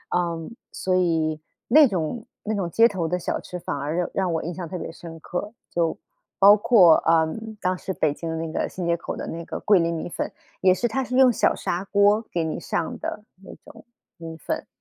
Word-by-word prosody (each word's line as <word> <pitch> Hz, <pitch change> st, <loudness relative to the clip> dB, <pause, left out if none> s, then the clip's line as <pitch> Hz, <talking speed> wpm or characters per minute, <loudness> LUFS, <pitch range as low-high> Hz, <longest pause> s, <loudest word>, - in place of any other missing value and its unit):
嗯， 170 Hz, +4 st, -2 dB, 0.2 s
所 185 Hz, -1 st, -1 dB
以 160 Hz, -3 st, +1 dB, 0.3 s
那 295 Hz, +3 st, +7 dB
种 190 Hz, +3 st, -3 dB, 0.2 s
那 215 Hz, -, -2 dB
种 195 Hz, -5 st, -2 dB
街 230 Hz, +6 st, +5 dB
头 185 Hz, -7 st, -2 dB
的 180 Hz, +2 st, 0 dB
小 175 Hz, -, -3 dB
吃， 180 Hz, -, -7 dB
反 175 Hz, -, -4 dB
而 145 Hz, +3 st, -3 dB
让 180 Hz, 0 st, -1 dB
让 185 Hz, -3 st, 0 dB
我 160 Hz, -, -1 dB
印 175 Hz, -, -4 dB
象 175 Hz, -2 st, -6 dB
特 180 Hz, -, -4 dB
别 165 Hz, -, -6 dB
深 165 Hz, 0 st, -10 dB
刻。 180 Hz, +6 st, -5 dB, 0.2 s
就 165 Hz, -2 st, 0 dB, 0.4 s
包 200 Hz, +1 st, +8 dB
括， 205 Hz, -7 st, +6 dB
呃， 165 Hz, -1 st, +3 dB, 0.3 s
当 185 Hz, -1 st, 0 dB
时 190 Hz, -, -5 dB
北 155 Hz, -4 st, +1 dB
京 165 Hz, +2 st, -6 dB
的 160 Hz, -, -2 dB
那 160 Hz, 0 st, -4 dB
个 -, -, -1 dB
新 180 Hz, -, -5 dB
街 170 Hz, 0 st, +2 dB
口 170 Hz, -, -6 dB
的 -, -, -5 dB
那 165 Hz, +1 st, -6 dB
个 -, -, -5 dB
桂 205 Hz, -4 st, +4 dB
林 165 Hz, 0 st, +1 dB
米 160 Hz, -, -4 dB
粉， -, -, -4 dB, 0.3 s
也 185 Hz, -, +5 dB
是 240 Hz, +6 st, +1 dB
它 265 Hz, +4 st, -1 dB
是 250 Hz, 0 st, -4 dB
用 260 Hz, -2 st, +6 dB
小 -, -, +2 dB
砂 175 Hz, +2 st, -2 dB
锅 205 Hz, +2 st, +3 dB
给 170 Hz, -2 st, 0 dB
你 160 Hz, -, -3 dB
上 165 Hz, -, -3 dB
的 210 Hz, -, -5 dB, 0.2 s
那 -, -, -11 dB
种 -, -, -14 dB, 0.3 s
米 165 Hz, -1 st, -8 dB
粉， -, -, -4 dB
175 Hz, 245 characters per minute, -24 LUFS, 165-200 Hz, 0.4 s, 包